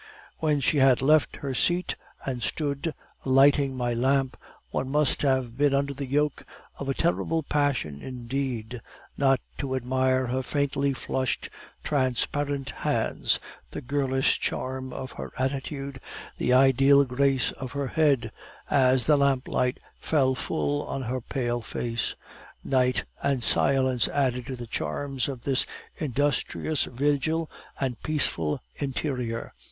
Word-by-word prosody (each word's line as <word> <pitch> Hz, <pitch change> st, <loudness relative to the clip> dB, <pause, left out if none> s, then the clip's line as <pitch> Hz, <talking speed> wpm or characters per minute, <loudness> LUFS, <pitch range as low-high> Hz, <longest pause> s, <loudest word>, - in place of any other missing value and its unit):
When 150 Hz, -3 st, +1 dB
she 145 Hz, -, +2 dB
had 130 Hz, -2 st, +5 dB
left 155 Hz, +1 st, +4 dB
her 135 Hz, -, -1 dB
seat 175 Hz, +7 st, +2 dB, 0.3 s
and 125 Hz, -3 st, -3 dB
stood 145 Hz, +4 st, -2 dB, 0.3 s
lighting 135 Hz, 0 st, +4 dB
my 120 Hz, -1 st, 0 dB
lamp, 135 Hz, +2 st, +1 dB, 0.4 s
one 130 Hz, -, -2 dB
must 150 Hz, -1 st, +2 dB
have 130 Hz, -4 st, +1 dB
been 145 Hz, -1 st, +4 dB
under 140 Hz, 0 st, 0 dB
the 140 Hz, 0 st, -5 dB
yoke 145 Hz, +2 st, 0 dB, 0.4 s
of 140 Hz, -, -4 dB
a 135 Hz, -, 0 dB
terrible 165 Hz, -1 st, 0 dB
passion 140 Hz, -, 0 dB
indeed, 125 Hz, -2 st, -4 dB, 0.3 s
not 135 Hz, -2 st, +3 dB, 0.2 s
to 130 Hz, -1 st, -2 dB
admire 130 Hz, +1 st, +1 dB
her 130 Hz, +2 st, -1 dB
faintly 140 Hz, +1 st, 0 dB
flushed 130 Hz, -1 st, -2 dB, 0.3 s
transparent 140 Hz, 0 st, 0 dB
hands, -, -, 0 dB, 0.3 s
the -, -, -6 dB
girlish 135 Hz, +1 st, +1 dB
charm 130 Hz, 0 st, -3 dB
of 130 Hz, 0 st, -6 dB
her -, -, -7 dB
attitude, 135 Hz, 0 st, -3 dB, 0.4 s
the -, -, +1 dB
ideal 135 Hz, +2 st, +6 dB
grace 135 Hz, 0 st, +1 dB
of 130 Hz, -2 st, -7 dB
her 140 Hz, -2 st, -2 dB
head, 140 Hz, -8 st, +2 dB, 0.4 s
as 130 Hz, -2 st, +4 dB
the 150 Hz, -1 st, +5 dB
lamplight 130 Hz, -2 st, +1 dB, 0.2 s
fell 135 Hz, -4 st, +2 dB
full 145 Hz, +3 st, -1 dB
on 135 Hz, -, -3 dB
her 130 Hz, +1 st, -2 dB
pale 120 Hz, 0 st, -2 dB
face. 115 Hz, +1 st, -2 dB, 0.5 s
Night 130 Hz, -1 st, +2 dB, 0.2 s
and 135 Hz, -4 st, 0 dB
silence 130 Hz, -3 st, +3 dB
added 125 Hz, -4 st, 0 dB
to 130 Hz, -, -4 dB
the 120 Hz, -1 st, -7 dB
charms 135 Hz, +3 st, -2 dB
of 130 Hz, -4 st, -6 dB
this 135 Hz, -2 st, +2 dB, 0.3 s
industrious 145 Hz, +1 st, 0 dB
vigil 145 Hz, +5 st, 0 dB, 0.3 s
and 130 Hz, -4 st, -2 dB
peaceful 85 Hz, -, 0 dB
interior. 125 Hz, -4 st, -3 dB
135 Hz, 135 wpm, -27 LUFS, 125-140 Hz, 0.5 s, ideal